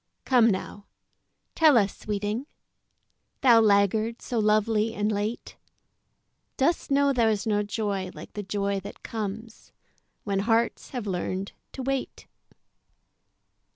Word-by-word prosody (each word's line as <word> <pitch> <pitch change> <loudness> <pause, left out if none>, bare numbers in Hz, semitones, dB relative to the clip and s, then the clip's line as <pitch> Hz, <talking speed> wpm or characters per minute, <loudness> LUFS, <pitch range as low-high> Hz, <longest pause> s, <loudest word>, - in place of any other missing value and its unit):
Come 245 -3 +5
now 205 +1 -4 0.7
tell 310 -5 +5
us, 200 -3 +2
sweeting, 210 +5 -3 0.9
Thou 235 -3 +6
laggard 215 +2 +2
so 240 - -3
lovely 215 +1 +2
and 210 +1 0
late, 210 +3 -3 1.0
Dost 320 +6 +1
know 280 0 +3
there's 220 -5 +1
no 210 -2 +1
joy 205 -2 -2
like - - -11
the 210 - -4
joy 200 0 -2
that 200 +2 -11
comes 220 +1 -6 0.5
When 200 -2 -1
hearts 225 +3 0
have 245 -5 -5
learned 185 0 -3 0.2
to 265 - -5
wait? 270 0 -3
215 Hz, 120 wpm, -26 LUFS, 200-235 Hz, 1.0 s, Thou